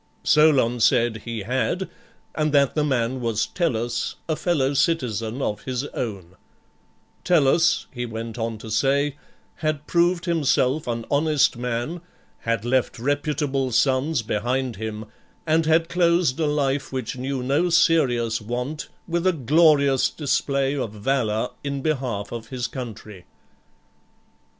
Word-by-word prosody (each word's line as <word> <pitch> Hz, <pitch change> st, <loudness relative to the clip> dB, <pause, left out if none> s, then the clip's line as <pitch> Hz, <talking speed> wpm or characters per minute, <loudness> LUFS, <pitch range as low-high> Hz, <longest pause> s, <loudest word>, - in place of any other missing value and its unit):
Soion 140 Hz, -6 st, +4 dB
said 115 Hz, 0 st, +3 dB
he 115 Hz, -2 st, -4 dB
had, 130 Hz, -, -1 dB, 0.5 s
and 155 Hz, -1 st, 0 dB
that 140 Hz, -2 st, +4 dB
the 150 Hz, -, +1 dB
man 130 Hz, -3 st, 0 dB
was 115 Hz, -2 st, 0 dB
Tellus, 120 Hz, -8 st, -1 dB
a 160 Hz, -, 0 dB
fellow 145 Hz, -5 st, 0 dB
citizen 125 Hz, -5 st, 0 dB
of 105 Hz, -, -2 dB
his 130 Hz, +1 st, -2 dB
own; 95 Hz, -6 st, -6 dB, 0.9 s
Tellus, 165 Hz, 0 st, +3 dB
he 120 Hz, -2 st, -4 dB
went 115 Hz, +1 st, -6 dB
on 115 Hz, -1 st, -2 dB
to 110 Hz, +1 st, -9 dB
say, 140 Hz, +5 st, +1 dB, 0.4 s
had 155 Hz, -2 st, -2 dB
proved 175 Hz, 0 st, +2 dB
himself 150 Hz, -4 st, +1 dB
an 115 Hz, -1 st, -3 dB
honest 150 Hz, -1 st, +3 dB
man, 125 Hz, +7 st, -3 dB, 0.4 s
had 115 Hz, -1 st, -2 dB
left 130 Hz, +1 st, +1 dB
reputable 140 Hz, 0 st, -1 dB
sons 135 Hz, +2 st, +2 dB
behind 120 Hz, +2 st, -1 dB
him, 110 Hz, 0 st, -5 dB, 0.4 s
and 160 Hz, 0 st, +2 dB
had 165 Hz, +1 st, +3 dB
closed 170 Hz, -4 st, +2 dB
a 155 Hz, -, +1 dB
life 140 Hz, -2 st, 0 dB
which 130 Hz, -4 st, -4 dB
knew 130 Hz, 0 st, -3 dB
no 145 Hz, +7 st, +1 dB
serious 125 Hz, -10 st, +2 dB
want 125 Hz, +7 st, -4 dB, 0.2 s
with 170 Hz, +1 st, 0 dB
a -, -, +5 dB
glorious 145 Hz, -1 st, +4 dB
display 140 Hz, -2 st, 0 dB
of 120 Hz, -7 st, -3 dB
valour 110 Hz, 0 st, 0 dB
in 140 Hz, -1 st, -3 dB
behalf 125 Hz, -9 st, -2 dB
of 115 Hz, -1 st, -6 dB
his 125 Hz, -1 st, -4 dB
country. 110 Hz, -6 st, -8 dB
135 Hz, 135 wpm, -23 LUFS, 115-150 Hz, 0.9 s, a